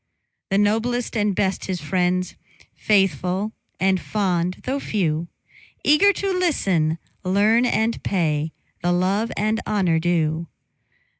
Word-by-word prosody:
The 195 Hz, -, +2 dB
noblest 225 Hz, +4 st, 0 dB
and 210 Hz, -3 st, +1 dB
best 190 Hz, 0 st, 0 dB
his 185 Hz, -2 st, -3 dB
friends, 180 Hz, +3 st, 0 dB, 0.4 s
Faithful 195 Hz, 0 st, +1 dB, 0.3 s
and 190 Hz, -1 st, +2 dB
fond, 180 Hz, -4 st, -1 dB
though 270 Hz, +2 st, -2 dB
few; 170 Hz, -, -1 dB, 0.6 s
Eager 300 Hz, +8 st, +5 dB
to 395 Hz, 0 st, -2 dB
listen, 190 Hz, -, +1 dB, 0.3 s
learn, 210 Hz, +6 st, +3 dB
and 230 Hz, -1 st, 0 dB
pay 160 Hz, -4 st, 0 dB, 0.3 s
The 175 Hz, +1 st, +1 dB
love 195 Hz, +5 st, +1 dB
and 215 Hz, +2 st, 0 dB
honor 180 Hz, -6 st, +2 dB
due. 165 Hz, -1 st, 0 dB
190 Hz, 120 wpm, -22 LUFS, 175-220 Hz, 0.6 s, Eager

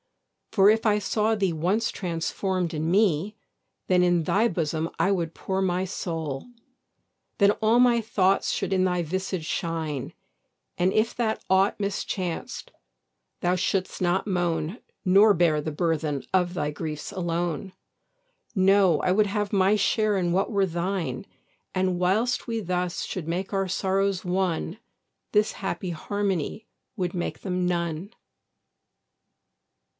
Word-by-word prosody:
For 200 Hz, -2 st, +5 dB
if 220 Hz, +1 st, +2 dB
I 210 Hz, -1 st, +3 dB
saw 215 Hz, +2 st, +1 dB
thee 195 Hz, -5 st, 0 dB
once 185 Hz, +8 st, 0 dB
transform'd 180 Hz, 0 st, -2 dB
in 155 Hz, +1 st, -1 dB
me, 200 Hz, +1 st, +2 dB, 0.5 s
Then 180 Hz, -1 st, +4 dB
in 175 Hz, -2 st, +3 dB
thy 210 Hz, +8 st, +2 dB
bosom 165 Hz, -1 st, -1 dB
I 180 Hz, +4 st, +3 dB
would 170 Hz, -4 st, -1 dB
pour 190 Hz, 0 st, -2 dB
my 185 Hz, 0 st, 0 dB
soul; 160 Hz, -, -4 dB, 0.9 s
Then 200 Hz, -1 st, +5 dB
all 220 Hz, +2 st, +4 dB
my 240 Hz, -2 st, +5 dB
thoughts 195 Hz, -3 st, +2 dB
should -, -, -1 dB
in 185 Hz, -1 st, +3 dB
thy 180 Hz, -1 st, +1 dB
visage 185 Hz, 0 st, -3 dB
shine, 160 Hz, -6 st, -3 dB, 0.7 s
And 180 Hz, +2 st, +2 dB
if 215 Hz, +3 st, +1 dB
that 225 Hz, -2 st, -1 dB
aught 190 Hz, +2 st, +3 dB
mischanced 190 Hz, -3 st, -3 dB, 0.7 s
thou 180 Hz, +1 st, +2 dB
should'st 185 Hz, +1 st, -1 dB
not 175 Hz, +1 st, +1 dB
moan 175 Hz, 0 st, -1 dB, 0.3 s
Nor 200 Hz, +3 st, +6 dB
bear 160 Hz, -3 st, +3 dB
the 155 Hz, -, -3 dB
burthen 155 Hz, -3 st, -1 dB
of 180 Hz, -2 st, +2 dB
thy 150 Hz, -4 st, -1 dB
griefs 150 Hz, +2 st, -5 dB
alone: 175 Hz, -1 st, -2 dB, 0.8 s
No, 190 Hz, -4 st, +4 dB
I 180 Hz, -, +1 dB
would 210 Hz, +2 st, +3 dB
have 205 Hz, 0 st, -2 dB
my 195 Hz, +1 st, +4 dB
share 215 Hz, 0 st, +2 dB
in 175 Hz, -2 st, 0 dB
what 195 Hz, +4 st, +1 dB
were 200 Hz, -2 st, +2 dB
thine: 185 Hz, +3 st, -2 dB, 0.5 s
And 185 Hz, -1 st, +1 dB
whilst 215 Hz, +9 st, +1 dB
we 230 Hz, -1 st, -1 dB
thus 180 Hz, -2 st, -2 dB
should 175 Hz, -5 st, -5 dB
make 180 Hz, +4 st, -3 dB
our 195 Hz, -1 st, +1 dB
sorrows 195 Hz, 0 st, 0 dB
one, 180 Hz, +1 st, -1 dB, 0.5 s
This 210 Hz, 0 st, +2 dB
happy 190 Hz, -2 st, -4 dB
harmony 200 Hz, +3 st, -2 dB, 0.3 s
would 180 Hz, -3 st, -1 dB
make 175 Hz, -2 st, -3 dB
them 180 Hz, -2 st, -1 dB
none. 170 Hz, +2 st, -2 dB
185 Hz, 140 wpm, -26 LUFS, 170-200 Hz, 0.9 s, Nor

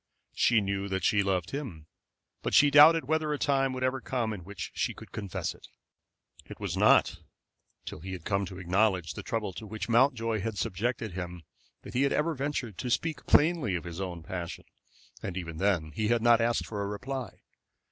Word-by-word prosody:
She 115 Hz, -3 st, +3 dB
knew 100 Hz, 0 st, -2 dB
that 95 Hz, 0 st, -2 dB
she 105 Hz, -3 st, +3 dB
loved 95 Hz, -2 st, -1 dB
him, 125 Hz, -, -6 dB, 0.6 s
but -, -, -1 dB
she 145 Hz, 0 st, +6 dB
doubted 155 Hz, +2 st, +8 dB
whether 155 Hz, +1 st, 0 dB
a 150 Hz, -, 0 dB
time 135 Hz, -2 st, +1 dB
would 130 Hz, 0 st, -3 dB
ever 130 Hz, 0 st, 0 dB
come 120 Hz, -4 st, -2 dB
in 95 Hz, -4 st, -8 dB
which 100 Hz, 0 st, -7 dB
she -, -, -1 dB
could -, -, -12 dB
confess 100 Hz, -5 st, -4 dB
it. -, -, -16 dB, 0.8 s
It -, -, -11 dB
was -, -, -3 dB
not -, -, +4 dB, 0.7 s
till -, -, -7 dB
he 95 Hz, +4 st, -7 dB
had 90 Hz, -3 st, -8 dB
come 100 Hz, -1 st, 0 dB
to 90 Hz, -, -9 dB
acknowledge 95 Hz, -2 st, +1 dB
the -, -, -6 dB
trouble 105 Hz, -4 st, -3 dB
to 110 Hz, -, -8 dB
which 110 Hz, +1 st, -5 dB
Mountjoy 115 Hz, -2 st, +3 dB
had 110 Hz, 0 st, -3 dB
subjected 110 Hz, +4 st, -2 dB
him 90 Hz, -1 st, -6 dB, 0.4 s
that -, -, -10 dB
he 125 Hz, -, +1 dB
had 140 Hz, -, +2 dB
ever 160 Hz, +2 st, +1 dB
ventured 135 Hz, -, -3 dB
to 125 Hz, -, -3 dB
speak 160 Hz, +5 st, -1 dB
plainly 150 Hz, -, +3 dB
of 85 Hz, -, -3 dB
his 85 Hz, +2 st, -6 dB
own 90 Hz, -3 st, -5 dB
passion, 90 Hz, -2 st, -6 dB, 0.6 s
and 95 Hz, -1 st, -5 dB
even 85 Hz, -3 st, -5 dB
then 90 Hz, -5 st, +1 dB
he 110 Hz, +6 st, -1 dB
had 115 Hz, 0 st, +2 dB
not 120 Hz, -1 st, +5 dB
asked 115 Hz, +1 st, +1 dB
for 105 Hz, -2 st, -4 dB
a 100 Hz, -, -2 dB
reply. 125 Hz, +1 st, -5 dB
110 Hz, 200 wpm, -29 LUFS, 95-130 Hz, 0.8 s, doubted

